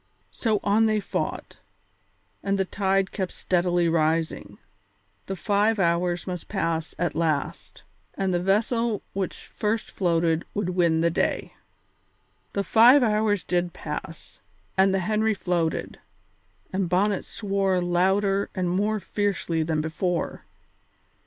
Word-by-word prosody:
So 220 Hz, -3 st, 0 dB
on 215 Hz, +2 st, +3 dB
they 215 Hz, -1 st, +2 dB
fought, -, -, -4 dB, 0.8 s
and 195 Hz, 0 st, 0 dB
the 190 Hz, -, +1 dB
tide 195 Hz, 0 st, 0 dB
kept 190 Hz, -3 st, -3 dB
steadily 175 Hz, -1 st, +1 dB
rising. 160 Hz, 0 st, 0 dB, 0.7 s
The 195 Hz, -, -3 dB
five 205 Hz, +5 st, +1 dB
hours 175 Hz, -1 st, +1 dB
must 180 Hz, -2 st, -5 dB
pass 165 Hz, -1 st, -2 dB
at 175 Hz, -1 st, -1 dB
last, 155 Hz, -3 st, -2 dB, 0.3 s
and 190 Hz, -1 st, 0 dB
the 175 Hz, -, +1 dB
vessel 215 Hz, +3 st, +1 dB
which 195 Hz, -1 st, -4 dB
first 215 Hz, +1 st, -2 dB
floated 165 Hz, -3 st, +1 dB
would 205 Hz, -3 st, -1 dB
win 170 Hz, -3 st, +2 dB
the 170 Hz, 0 st, +2 dB
day. -, -, -1 dB, 1.0 s
The 200 Hz, -, 0 dB
five 245 Hz, +7 st, +6 dB
hours 210 Hz, -3 st, +1 dB
did 175 Hz, -1 st, -1 dB
pass, -, -, -7 dB, 0.4 s
and 190 Hz, 0 st, +4 dB
the 190 Hz, 0 st, +1 dB
Henry 215 Hz, +3 st, +1 dB
floated, 175 Hz, -4 st, -2 dB, 0.7 s
and 190 Hz, -2 st, 0 dB
Bonnet 195 Hz, +2 st, +1 dB
swore 195 Hz, -3 st, 0 dB
louder 190 Hz, +3 st, +1 dB
and 180 Hz, -2 st, 0 dB
more 210 Hz, +4 st, +1 dB
fiercely 195 Hz, -5 st, -1 dB
than 160 Hz, -1 st, 0 dB
before. 170 Hz, +2 st, -2 dB
190 Hz, 125 wpm, -25 LUFS, 175-205 Hz, 1.0 s, five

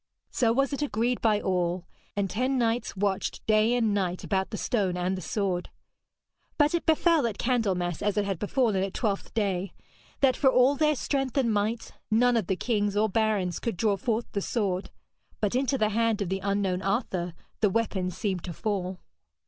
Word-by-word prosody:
So 230 Hz, -3 st, +2 dB
was 275 Hz, +4 st, +1 dB
it 280 Hz, -, -3 dB
agreed 245 Hz, -3 st, 0 dB
by 215 Hz, -2 st, +3 dB
all, 180 Hz, -2 st, -1 dB, 0.3 s
and 200 Hz, -1 st, 0 dB
ten 255 Hz, +7 st, 0 dB
knights 230 Hz, -2 st, 0 dB
watched 195 Hz, -1 st, -1 dB
day 215 Hz, +2 st, +3 dB
and 225 Hz, -4 st, +2 dB
night 185 Hz, -3 st, -1 dB
about 190 Hz, -1 st, 0 dB
the 215 Hz, -, -5 dB
stone 195 Hz, -7 st, 0 dB
and 180 Hz, +1 st, 0 dB
the 185 Hz, -, -5 dB
sword. 185 Hz, -1 st, -2 dB, 0.9 s
But 295 Hz, +1 st, +3 dB
it 340 Hz, -, -1 dB
befell 320 Hz, -3 st, +4 dB
at 215 Hz, -, -4 dB
Candlemas 195 Hz, -9 st, 0 dB
as 205 Hz, 0 st, 0 dB
it 205 Hz, -, +2 dB
had 195 Hz, -4 st, -2 dB
befallen 220 Hz, -1 st, +1 dB
at 195 Hz, 0 st, -3 dB
Twelfth 205 Hz, -5 st, -1 dB
Day, 195 Hz, -4 st, -1 dB, 0.5 s
that 265 Hz, -2 st, +4 dB
for 270 Hz, -, +4 dB
all 255 Hz, +2 st, +5 dB
their 305 Hz, +1 st, +2 dB
strength 270 Hz, -1 st, -2 dB
and 235 Hz, -5 st, +2 dB
might, 215 Hz, +3 st, -1 dB, 0.2 s
none 245 Hz, +3 st, +4 dB
of 220 Hz, -6 st, 0 dB
the 190 Hz, -, +1 dB
kings 205 Hz, -1 st, 0 dB
or 215 Hz, +1 st, +3 dB
barons 205 Hz, -4 st, 0 dB
could 230 Hz, -7 st, -3 dB
draw 210 Hz, +1 st, +2 dB
forth 230 Hz, +2 st, -1 dB
the 200 Hz, -, -2 dB
sword; 195 Hz, -4 st, -1 dB, 0.5 s
but 210 Hz, -2 st, 0 dB
into 270 Hz, +2 st, +1 dB
the 215 Hz, -3 st, +2 dB
hand 225 Hz, 0 st, +1 dB
of 180 Hz, -, -5 dB
the 190 Hz, +1 st, -1 dB
unknown 195 Hz, -2 st, 0 dB
Arthur 190 Hz, -4 st, -1 dB, 0.2 s
the 210 Hz, -, +3 dB
weapon 195 Hz, -3 st, 0 dB
seemed 185 Hz, -1 st, -3 dB
to 175 Hz, -, -5 dB
fall. 190 Hz, -2 st, -2 dB
210 Hz, 190 wpm, -27 LUFS, 190-240 Hz, 0.9 s, all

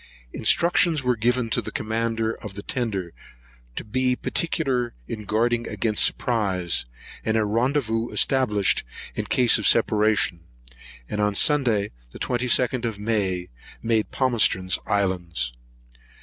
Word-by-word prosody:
Instructions 170 Hz, -3 st, +2 dB
were 125 Hz, -1 st, +2 dB
given 120 Hz, +2 st, +1 dB
to -, -, +1 dB
the -, -, -7 dB
commander 115 Hz, 0 st, -1 dB
of 105 Hz, -4 st, -9 dB
the 100 Hz, -, -6 dB
tender 100 Hz, -9 st, -3 dB, 0.6 s
to -, -, -4 dB
be 125 Hz, +3 st, 0 dB
particular 130 Hz, -6 st, -1 dB
in 110 Hz, -2 st, -6 dB
guarding 115 Hz, +3 st, 0 dB
against 110 Hz, -2 st, 0 dB
surprise, 95 Hz, -, 0 dB, 0.4 s
and 110 Hz, 0 st, +1 dB
a 110 Hz, -, +2 dB
rendezvous 115 Hz, +1 st, 0 dB
established, 105 Hz, -7 st, +2 dB, 0.3 s
in -, -, -3 dB
case 120 Hz, -3 st, +4 dB
of 105 Hz, -, +1 dB
separation; 110 Hz, -5 st, +3 dB, 0.7 s
and 105 Hz, -, -3 dB
on 105 Hz, -1 st, +1 dB
Sunday, 120 Hz, -8 st, +3 dB, 0.2 s
the -, -, -9 dB
22nd 125 Hz, 0 st, +1 dB
of 115 Hz, -3 st, -2 dB
May, 100 Hz, -4 st, -1 dB, 0.3 s
made 115 Hz, -2 st, +1 dB
Palmerston's 110 Hz, -8 st, +2 dB
Islands. 85 Hz, -11 st, -1 dB
115 Hz, 125 wpm, -24 LUFS, 105-125 Hz, 0.7 s, case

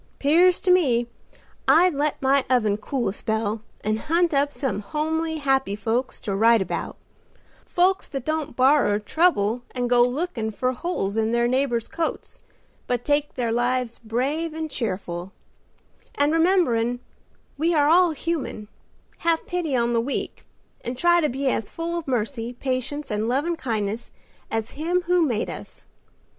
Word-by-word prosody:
'Pears 345 Hz, +5 st, +4 dB
to 370 Hz, -, +2 dB
me 260 Hz, -10 st, +3 dB, 0.6 s
I'd 355 Hz, +2 st, +5 dB
let 290 Hz, +1 st, -1 dB
my 270 Hz, 0 st, +3 dB
oven 220 Hz, -5 st, +3 dB
cool 240 Hz, +2 st, -2 dB
a -, -, -4 dB
spell, 220 Hz, 0 st, -2 dB, 0.2 s
and 215 Hz, +1 st, -1 dB
hunt 335 Hz, +3 st, +1 dB
up 285 Hz, +1 st, +2 dB
some 270 Hz, -7 st, -2 dB
homely, 315 Hz, +8 st, -2 dB
happy 270 Hz, -8 st, +1 dB
folks 225 Hz, +5 st, -2 dB
to 205 Hz, -, -3 dB
write 225 Hz, +3 st, +5 dB
about; 190 Hz, -, -3 dB, 0.7 s
folks 370 Hz, +2 st, +2 dB
that 270 Hz, -3 st, -5 dB
don't 310 Hz, -4 st, -2 dB
borrer 260 Hz, -5 st, +4 dB
trouble 230 Hz, -, +1 dB
and 245 Hz, -1 st, 0 dB
go 245 Hz, 0 st, +4 dB
lookin' 250 Hz, -2 st, 0 dB
for 255 Hz, +4 st, -1 dB
holes 245 Hz, -, -3 dB
in 220 Hz, +1 st, +1 dB
their 235 Hz, 0 st, +2 dB
neighbors' 250 Hz, -2 st, 0 dB
coats, 330 Hz, -1 st, -4 dB, 0.5 s
but 245 Hz, -1 st, -1 dB
take 290 Hz, 0 st, 0 dB
their 235 Hz, -2 st, -1 dB
lives 245 Hz, 0 st, 0 dB
brave 280 Hz, +8 st, -2 dB
and 315 Hz, -1 st, -4 dB
cheerful; 185 Hz, -6 st, -4 dB, 0.8 s
and 290 Hz, +2 st, +2 dB
rememberin' 315 Hz, -9 st, +2 dB, 0.6 s
we 325 Hz, +3 st, +1 dB
are 290 Hz, -1 st, +4 dB
all 350 Hz, +3 st, +5 dB
human, 305 Hz, -9 st, -3 dB, 0.5 s
have 330 Hz, -1 st, +1 dB
pity 345 Hz, -6 st, -2 dB
on 240 Hz, -1 st, +1 dB
the 230 Hz, -, +2 dB
weak, 275 Hz, +4 st, -4 dB, 0.4 s
and 245 Hz, +1 st, -4 dB
try 345 Hz, +4 st, +4 dB
to 300 Hz, -, +1 dB
be 270 Hz, +2 st, -2 dB
as 225 Hz, -5 st, 0 dB
full 335 Hz, +1 st, -4 dB
of 335 Hz, -3 st, -4 dB
mercy, 235 Hz, -1 st, -2 dB
patience 265 Hz, +3 st, -3 dB
and 210 Hz, +2 st, -1 dB
lovin' 295 Hz, +7 st, 0 dB
kindness 225 Hz, -5 st, -3 dB, 0.4 s
as 225 Hz, -1 st, -3 dB
Him 345 Hz, +5 st, -1 dB
who 355 Hz, 0 st, +2 dB
made 240 Hz, -9 st, 0 dB
us. -, -, -9 dB
265 Hz, 155 wpm, -24 LUFS, 230-320 Hz, 0.8 s, I'd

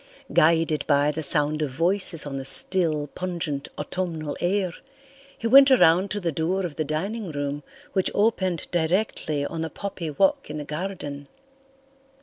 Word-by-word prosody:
Guided 160 Hz, -1 st, +3 dB
by 145 Hz, 0 st, +3 dB
the 155 Hz, +2 st, -4 dB
sound 150 Hz, +1 st, +2 dB
of 150 Hz, -, -1 dB
voices 170 Hz, +3 st, +1 dB
on 140 Hz, -2 st, -5 dB
the 135 Hz, -, -5 dB
still, 155 Hz, +1 st, +3 dB
pungent 160 Hz, -3 st, -4 dB
autumnal 165 Hz, -5 st, -4 dB
air, 185 Hz, 0 st, 0 dB, 0.6 s
he -, -, -8 dB
went 270 Hz, +4 st, +8 dB
around 190 Hz, -7 st, +5 dB
to 205 Hz, -, -3 dB
the 175 Hz, -4 st, -1 dB
door 175 Hz, +5 st, -1 dB
of 160 Hz, -4 st, -6 dB
the 155 Hz, -, -1 dB
dining 190 Hz, +8 st, -3 dB
room 145 Hz, 0 st, -3 dB, 0.3 s
which 190 Hz, -, +1 dB
opened 190 Hz, -5 st, +1 dB
directly 160 Hz, -4 st, -1 dB
on 160 Hz, +2 st, -5 dB
the 160 Hz, -, -3 dB
poppy 180 Hz, -1 st, -6 dB
walk 285 Hz, -, +1 dB
in 150 Hz, -, -5 dB
the 150 Hz, -, -5 dB
garden. 150 Hz, -3 st, -5 dB
165 Hz, 155 wpm, -24 LUFS, 150-190 Hz, 0.6 s, went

